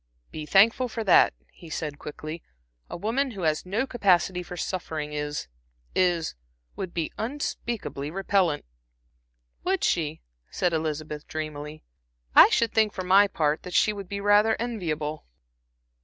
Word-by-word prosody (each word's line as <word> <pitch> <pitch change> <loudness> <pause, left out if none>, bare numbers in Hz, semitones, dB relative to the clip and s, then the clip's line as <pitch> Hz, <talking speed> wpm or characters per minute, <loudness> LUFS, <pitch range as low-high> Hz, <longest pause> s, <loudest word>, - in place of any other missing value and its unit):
"Be 155 -1 -6
thankful 225 +8 +5
for 230 -1 -4
that," 185 - +5 0.2
he 170 - -13
said, 150 -2 -4
quickly. 155 +2 -7 0.5
"A - - -5
woman 235 +9 0
who 200 -7 -7
has 155 +2 0
no 215 +8 0
capacity 190 -7 +2
for 180 0 -8
suffering 160 -5 -4
is 150 - -3 0.5
is 175 -3 +1 0.4
would 185 - -5
be 165 -2 -2
unspeakably 235 - -3
repellant." 185 -2 +1 1.0
"Would 380 0 0
she?" 160 -2 0 0.3
said 180 -2 0
Elizabeth, 155 -1 -3
dreamily. 155 -1 -6 0.5
"I - - +9
should 230 -1 +1
think, 220 -2 +3
for 185 - -4
my 195 +3 +6
part, 155 -4 0
that 180 - -7
she 215 - +4
would 200 -3 -8
be 200 - -3
rather 205 +2 +4
enviable." 160 -10 -3
180 Hz, 140 wpm, -26 LUFS, 155-210 Hz, 1.0 s, I